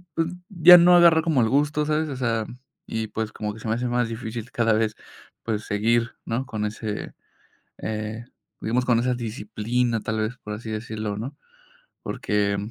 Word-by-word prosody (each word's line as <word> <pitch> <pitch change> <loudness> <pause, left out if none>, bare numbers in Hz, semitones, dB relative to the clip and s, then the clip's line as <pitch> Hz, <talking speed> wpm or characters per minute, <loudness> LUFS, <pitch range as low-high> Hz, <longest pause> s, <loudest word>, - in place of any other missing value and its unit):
pues, 165 0 +1 0.2
ya 180 -2 +9
no 175 +1 +7
agarrar 170 -2 +6
como 155 -6 +2
el 110 - +2
gusto, 150 +3 +1
¿sabes? 155 +1 0
O 140 - -4
sea, 115 -3 0 0.4
y, 110 0 -3
pues, 110 +1 -4
como 105 -1 -4
que 110 - -11
se 110 - -7
me 110 - +1
hace 125 +1 -2
más 120 -1 0
difícil 115 0 -6
cada 115 -2 +2
vez, 110 0 +1 0.5
pues, 110 -2 -2
seguir, 115 +3 +1
¿no? 120 +4 -2
Con 110 -4 -3
ese, 105 0 -5 0.7
eh, 110 +1 -4 0.4
digamos, 125 +3 0
con 120 -2 +3
esa 125 +1 +1
disciplina, 115 +1 -2
tal 110 +1 -2
vez, 110 +3 -3
por 105 - -7
así 110 +1 -6
decirlo, 110 -1 -4
¿no? 120 +6 -6 0.7
Porque, 105 -1 0
115 Hz, 180 wpm, -24 LUFS, 110-125 Hz, 0.7 s, ya